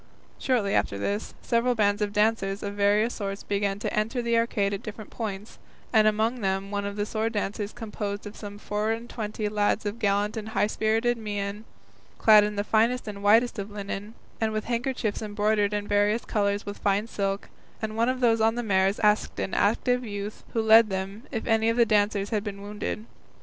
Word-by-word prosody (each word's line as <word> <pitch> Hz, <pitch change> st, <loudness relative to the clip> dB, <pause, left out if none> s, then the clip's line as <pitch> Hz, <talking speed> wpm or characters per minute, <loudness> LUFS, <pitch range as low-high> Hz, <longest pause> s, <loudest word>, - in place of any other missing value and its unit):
Shortly 230 Hz, -7 st, +1 dB
after 100 Hz, -, +1 dB
this, 200 Hz, -, -3 dB
several 240 Hz, +1 st, +2 dB
bands 205 Hz, -1 st, +2 dB
of 205 Hz, -1 st, 0 dB
dancers 210 Hz, -2 st, +1 dB
of 200 Hz, 0 st, -3 dB
various 205 Hz, +3 st, +2 dB
sorts 195 Hz, -1 st, -4 dB
began 200 Hz, -1 st, -1 dB
to 205 Hz, -, -3 dB
enter 215 Hz, +4 st, 0 dB
the 235 Hz, -1 st, +1 dB
arcade 215 Hz, -3 st, +1 dB
at 195 Hz, -, -3 dB
different 215 Hz, 0 st, -8 dB
points, 210 Hz, -2 st, -6 dB, 0.3 s
and 215 Hz, -1 st, +6 dB
among 220 Hz, +3 st, +1 dB
them 195 Hz, 0 st, -1 dB
one 200 Hz, 0 st, -2 dB
of 205 Hz, +1 st, -3 dB
sword 220 Hz, +2 st, -1 dB
dancers 205 Hz, 0 st, -2 dB
composed 210 Hz, -3 st, -5 dB
of 205 Hz, +1 st, -8 dB
some 205 Hz, -1 st, -8 dB
four 210 Hz, +1 st, -2 dB
and 230 Hz, +1 st, -6 dB
twenty 215 Hz, -2 st, -4 dB
lads 210 Hz, +1 st, 0 dB
of 205 Hz, +3 st, -3 dB
gallant 205 Hz, +1 st, +1 dB
and 220 Hz, 0 st, -5 dB
high 220 Hz, -2 st, +2 dB
spirited 225 Hz, +3 st, +1 dB
mien, 205 Hz, 0 st, -4 dB, 0.5 s
clad 215 Hz, -1 st, +7 dB
in 210 Hz, 0 st, -2 dB
the 205 Hz, -, 0 dB
finest 230 Hz, +4 st, +2 dB
and 200 Hz, -1 st, -6 dB
whitest 225 Hz, +3 st, +4 dB
of 200 Hz, +1 st, -4 dB
linen, 205 Hz, +1 st, -6 dB, 0.3 s
and 220 Hz, -1 st, +1 dB
with 215 Hz, 0 st, -1 dB
handkerchiefs 240 Hz, -2 st, -2 dB
embroidered 210 Hz, -1 st, +1 dB
in 205 Hz, 0 st, -2 dB
various 205 Hz, +2 st, +2 dB
colours 205 Hz, -2 st, 0 dB
with 205 Hz, 0 st, -6 dB
fine 200 Hz, +1 st, +1 dB
silk; 200 Hz, -3 st, -3 dB, 0.3 s
and 215 Hz, -1 st, -4 dB
one 230 Hz, +2 st, +2 dB
of 255 Hz, 0 st, -2 dB
those 230 Hz, -2 st, +3 dB
on 225 Hz, +1 st, +3 dB
the 240 Hz, -, -2 dB
mares 195 Hz, -1 st, +2 dB
asked 210 Hz, 0 st, +2 dB
an -, -, -3 dB
active 245 Hz, +4 st, +2 dB
youth 205 Hz, -1 st, -6 dB
who 225 Hz, -, +1 dB
led 220 Hz, 0 st, +7 dB
them 195 Hz, +6 st, -4 dB
if 225 Hz, -4 st, -3 dB
any 225 Hz, 0 st, +3 dB
of 230 Hz, -, 0 dB
the 235 Hz, -, +6 dB
dancers 205 Hz, -1 st, +1 dB
had 210 Hz, -2 st, 0 dB
been 200 Hz, -2 st, -6 dB
wounded. 210 Hz, +1 st, -4 dB
210 Hz, 200 wpm, -26 LUFS, 205-225 Hz, 0.5 s, clad